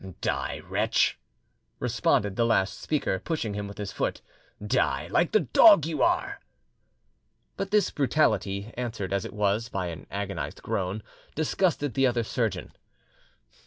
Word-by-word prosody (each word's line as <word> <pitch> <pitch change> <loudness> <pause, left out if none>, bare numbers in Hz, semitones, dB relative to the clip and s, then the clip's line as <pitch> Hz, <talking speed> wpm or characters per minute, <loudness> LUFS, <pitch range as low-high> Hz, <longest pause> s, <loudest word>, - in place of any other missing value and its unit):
"Die, - - -2
wretch!" - - +1 0.6
responded 100 -1 +1
the 115 - +2
last 115 -4 +1
speaker, 145 -11 -1
pushing 120 - -3
him 100 0 -4
with 100 +2 -10
his 105 -2 -4
foot. - - -2 0.5
"Die, 105 - +1
like 170 - +2
the 215 - +4
dog 170 - +7
you 155 -3 -2
are!" - - +1 1.2
But 195 - -3
this 210 0 +2
brutality, 110 -7 +1
answered 115 -6 -4
as 100 +2 -1
it - - -7
was 105 +2 0
by 90 -5 -3
an 80 - -9
agonised 100 0 -4
groan, 95 +2 -2 0.3
disgusted 155 -3 0
the 135 -1 +3
other 120 -1 0
surgeon. - - -2
115 Hz, 140 wpm, -27 LUFS, 100-150 Hz, 1.2 s, dog